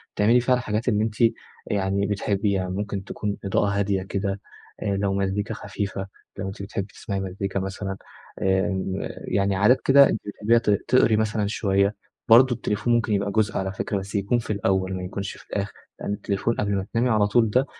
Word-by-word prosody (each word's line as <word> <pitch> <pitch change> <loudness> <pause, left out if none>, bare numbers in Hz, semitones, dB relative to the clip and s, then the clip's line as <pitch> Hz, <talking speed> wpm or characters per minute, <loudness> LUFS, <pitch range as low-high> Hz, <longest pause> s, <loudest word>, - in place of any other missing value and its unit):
تعملي 115 +4 +4
فيها 125 +1 +3
الحاجات 115 -1 -2
اللي 105 -1 +2
أنتِ 110 -1 -2 0.5
يعني 100 0 0
بتحبيها، 100 -2 0
ممكن 100 +1 -3
تكون 100 +1 -4
إضاءة 100 +1 +1
هادية 100 -1 0
كده، 100 0 -3 0.4
آآ، - - -6
لو 100 0 0
مزيكا 100 +3 -1
خفيفة، 100 -2 -4 0.3
لو 95 0 -3
أنتِ 95 +1 -7
بتحبي 100 0 -4
تسمعي 100 -3 -4
مزيكا 95 0 -3
مثلًا، 95 0 -4 0.4
آمم، 95 0 0 0.3
يعني 100 0 +1
عادات 105 +7 +4
كده 140 +1 +7
أنتِ - - -1
بتحبيها، 105 +3 +2
تق 105 -3 +2
تقري 125 -3 +4
مثلًا 105 -1 0
شوية. 100 -1 +1 0.3
برضه 120 +2 +7
التليفون 120 +1 -1
ممكن 115 -2 +2
يبقى 100 0 0
جزء 105 -1 +1
على 95 0 -2
فكرة 100 +1 -2
بس 100 +2 -6
يكون 100 +5 +1
في 110 - -3
الأول، 95 -1 0
ما 90 -1 -4
يكونش 95 +1 -4
في - - -16
الآخر، 100 +1 -3 0.3
لإن - - -2
التليفون 105 +3 -1
قبل 100 -1 0
ما 95 -1 -1
تنامي 120 +2 +2
على 110 -3 +3
طول 115 +1 +3
ده 130 +6 +2
100 Hz, 185 wpm, -24 LUFS, 95-110 Hz, 0.5 s, كده